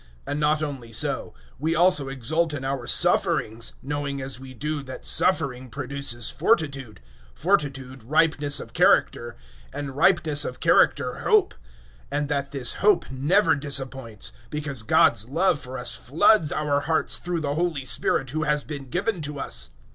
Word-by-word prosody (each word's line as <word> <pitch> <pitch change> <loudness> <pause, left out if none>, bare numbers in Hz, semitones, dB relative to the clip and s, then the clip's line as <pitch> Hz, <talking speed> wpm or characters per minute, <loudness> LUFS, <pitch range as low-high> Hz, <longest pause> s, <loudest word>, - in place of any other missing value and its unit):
005:003 - - -6
And 145 - -2
not 150 +1 +1
only 135 -6 -6
so: 110 - -1 0.3
we 160 +3 0
also 170 -5 +3
exult 150 +5 -1
in 135 -1 -6
our 135 -3 -3
sufferings, 115 +1 +1
knowing 140 0 -3
as 130 -2 -4
we 130 0 -10
do, 150 +3 -3
that 130 - -9
suffering 125 - +2
produces 135 -3 -3
fortitude; 140 - -1 0.3
005:004 - - -23
fortitude, 135 -4 -1
ripeness 150 0 +2
of - - -10
character; - - +2 0.4
and 140 -2 -6
ripeness 155 -2 +3
of 130 - -5
character, - - +3
hope; - - +3
005:005 - - -26 0.6
and 145 -1 -2
that 140 -1 -2
this 135 -3 -3
hope 205 -2 +2
never 160 +7 +2
disappoints, 135 -6 -4 0.2
because 145 -4 -4
God's 110 +1 +3
love 165 +2 +2
for 130 0 -7
us 125 -1 -1
floods 155 - +4
our 145 -1 0
hearts 160 +2 +1
through 175 -2 -3
the 145 -2 -2
Holy 160 -4 -2
Spirit 130 0 0
who 155 +2 -2
has 150 -1 0
been 140 -4 -8
given 195 - -1
to 145 -1 -5
us. - - -2
140 Hz, 160 wpm, -24 LUFS, 130-155 Hz, 0.6 s, floods